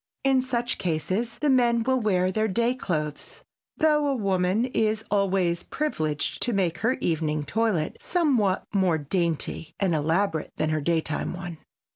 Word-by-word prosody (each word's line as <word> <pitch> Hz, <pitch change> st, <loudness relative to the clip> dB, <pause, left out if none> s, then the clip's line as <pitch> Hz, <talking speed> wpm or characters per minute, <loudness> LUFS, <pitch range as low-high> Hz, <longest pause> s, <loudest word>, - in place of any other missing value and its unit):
In 270 Hz, -1 st, +4 dB
such 240 Hz, -2 st, -2 dB
cases 185 Hz, +8 st, -1 dB
the 300 Hz, -, 0 dB
men 240 Hz, -3 st, +3 dB
will 260 Hz, +1 st, +2 dB
wear 185 Hz, -4 st, +1 dB
their 215 Hz, +3 st, +1 dB
day 235 Hz, +4 st, +1 dB
clothes, 155 Hz, -, -4 dB, 0.3 s
though 300 Hz, -3 st, +3 dB
a 275 Hz, -, +1 dB
woman 195 Hz, 0 st, +1 dB
is 220 Hz, -3 st, 0 dB
always 190 Hz, -4 st, +1 dB
privileged 155 Hz, -, -2 dB
to 240 Hz, -, 0 dB
make 180 Hz, -4 st, 0 dB
her 235 Hz, +3 st, +2 dB
evening 155 Hz, -, -1 dB
toilet 185 Hz, -1 st, 0 dB
somewhat 255 Hz, -, +1 dB
more 185 Hz, -5 st, +3 dB
dainty 165 Hz, 0 st, -2 dB
and 190 Hz, -4 st, +1 dB
elaborate 160 Hz, +2 st, 0 dB
than 155 Hz, -, 0 dB
her 155 Hz, -1 st, 0 dB
daytime 160 Hz, +1 st, -1 dB
one. 175 Hz, -3 st, -7 dB
190 Hz, 150 wpm, -26 LUFS, 165-235 Hz, 0.3 s, In